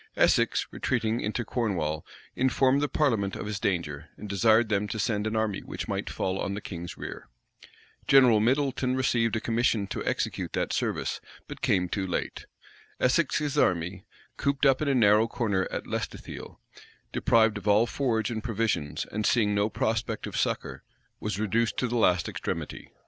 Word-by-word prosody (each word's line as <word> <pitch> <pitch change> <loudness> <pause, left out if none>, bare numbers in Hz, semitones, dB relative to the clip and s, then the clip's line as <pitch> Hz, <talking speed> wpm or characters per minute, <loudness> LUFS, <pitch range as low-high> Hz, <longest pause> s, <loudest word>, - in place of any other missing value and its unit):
Essex, - - +3
retreating 110 +2 -1
into 110 +3 -2
Cornwall, 85 -12 -1 0.3
informed 130 +1 +3
the 145 - 0
parliament 110 -10 +1
of - - -5
his 105 -1 -3
danger, 80 -6 -2
and 105 - -8
desired 110 +3 +4
them 105 -1 0
to 105 - -4
send 105 0 0
an 110 - -2
army 110 -3 0
which - - -6
might - - -3
fall 95 0 -2
on 100 - -2
the - - -3
king's 85 -4 -7
rear. - - -7 0.8
General 125 -5 +6
Middleton 130 +2 +1
received 120 -3 +1
a - - +1
commission 115 -2 +1
to 100 - -4
execute - - -2
that - - -1
service; - - -1 0.3
but - - -9
came 90 -1 +2
too 95 +1 -2
late. 90 - -3 0.5
Essex's 145 +1 +1
army, 90 +1 +1 0.3
cooped 140 0 0
up 135 0 +4
in 155 - 0
a 140 - +2
narrow 110 -1 +5
corner 110 -6 0
at - - -4
Lestithiel, - - -6 0.5
deprived 110 -2 +3
of 105 - -10
all 105 +3 +5
forage 120 -3 -1
and 110 -2 -4
provisions, 110 -10 -1
and 105 +1 -2
seeing 105 -2 +3
no 100 +1 +1
prospect 110 0 -1
of - - -6
succor, - - -2 0.4
was 105 -2 -3
reduced 110 +2 0
to 125 - +1
the 120 - -3
last 90 -7 +3
extremity. - - -5
110 Hz, 170 wpm, -27 LUFS, 100-120 Hz, 0.8 s, General